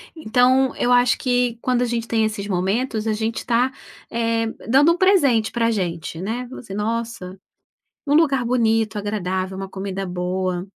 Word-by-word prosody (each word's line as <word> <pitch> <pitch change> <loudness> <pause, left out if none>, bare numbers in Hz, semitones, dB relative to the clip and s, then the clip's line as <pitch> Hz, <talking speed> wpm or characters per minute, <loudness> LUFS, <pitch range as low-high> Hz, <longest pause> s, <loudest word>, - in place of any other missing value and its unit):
Então, 260 -1 +2
eu 245 - 0
acho 245 -1 +4
que, 245 -2 0
quando 250 -1 +1
a - - +2
gente 235 -1 -2
tem 225 -1 +1
esses 210 -2 -3
momentos, 215 +5 -1
a 220 - +1
gente 220 +1 -2
tá, 245 +2 +1 0.4
eh, 230 0 0 0.2
dando 285 +6 +5
um - - -5
presente 285 - +3
pra 230 -1 +1
gente, 170 -4 -3
né? 240 +5 -3
Você 220 -6 -8
nossa, 220 -3 -4 0.7
um 285 - 0
lugar 280 -5 +3
bonito, 225 -3 +1
agradável, 190 -2 -3
uma 195 0 -5
comida 195 0 -5
boa. 180 0 -2
225 Hz, 160 wpm, -21 LUFS, 195-245 Hz, 0.7 s, dando